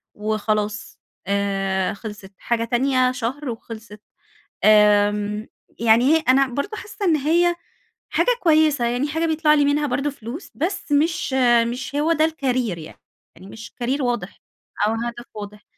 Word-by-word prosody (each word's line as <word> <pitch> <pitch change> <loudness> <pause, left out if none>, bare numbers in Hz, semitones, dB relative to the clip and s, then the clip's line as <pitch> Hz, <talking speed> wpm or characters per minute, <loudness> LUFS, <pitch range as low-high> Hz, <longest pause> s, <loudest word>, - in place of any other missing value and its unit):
وخلاص 215 0 -2 0.3
آآ 195 -1 0
خلصِت، 205 -1 -9
حاجة 230 -1 -1
تانية 255 +2 +2
شهر 255 +3 -4
وخلصِت، 225 -2 -9 0.6
آمم، 210 0 +4 0.3
يعني 230 +1 +4
هي - - +2
أنا 270 +1 +5
برضه 285 - -4
حاسة 405 0 -7
إن 330 -4 +4
هي 340 +4 +2 0.6
حاجة - - +1
كويسة، 310 -6 +3
يعني 245 +5 -1
حاجة 320 +2 -1
بيطلع 310 -1 +3
لي 290 -1 +3
منها 290 +1 +1
برضه 275 +3 -1
فلوس، 265 - -9
بس 335 -1 -3
مش 300 -2 +1 0.4
مش 260 +3 -6
هو 305 +3 +2
ده 315 -1 +2
الكارير 255 - -1
يعني، 155 0 -11 0.4
يعني 185 +3 -14
مش 220 +2 -11
كارير 265 +3 -2
واضح 240 -6 -3 0.5
أو 220 - +1
هدف 240 +1 -5
واضح. 210 0 -9
245 Hz, 145 wpm, -22 LUFS, 210-295 Hz, 0.6 s, أنا